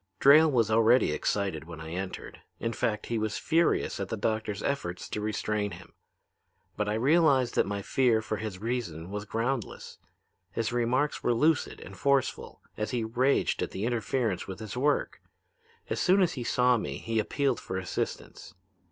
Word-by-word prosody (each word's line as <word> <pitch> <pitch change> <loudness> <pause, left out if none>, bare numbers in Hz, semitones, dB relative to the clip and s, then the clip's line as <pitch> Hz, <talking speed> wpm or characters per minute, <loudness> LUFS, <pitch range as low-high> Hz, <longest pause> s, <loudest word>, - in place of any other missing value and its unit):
"Drayle 155 +3 +7
was 115 -5 +2
already 115 -2 +4
excited 80 0 -1
when 85 -1 -9
I 80 0 -8
entered. 95 +2 -6 0.2
In 115 - -2
fact, 110 -3 -1
he 115 -1 -1
was 110 0 -2
furious 160 +5 +1
at 100 -1 -3
the 110 - -3
doctor's 110 -1 -2
efforts 90 -11 -3
to 105 - -3
restrain 105 -1 -1
him. 85 0 -12 0.8
But 105 0 -1
I 105 - 0
realized 135 0 +3
that - - +2
my 100 -1 -3
fear 125 -2 +2
for 110 -1 -3
his 105 -4 -5
reason 100 -7 -4
was 105 +1 -4
groundless. 115 +2 -3 0.5
His 115 0 -2
remarks 125 +5 +1
were 120 - +1
lucid 155 +5 +1
and - - -10
forceful 140 -3 0
as 105 0 -3
he 120 -1 -1
raged 125 +5 +1
at - - -1
the 95 +3 -4
interference 120 -3 -1
with 95 -1 -7
his 110 0 -7
work. 145 +3 0 0.7
As - - -2
soon 190 +1 +4
as 175 - +1
he 125 - -4
saw 125 +1 +3
me 70 -10 -4
he 115 +5 -2
appealed 135 +4 0
for 95 - -5
assistance. 90 -2 -5
110 Hz, 175 wpm, -28 LUFS, 100-125 Hz, 0.8 s, Drayle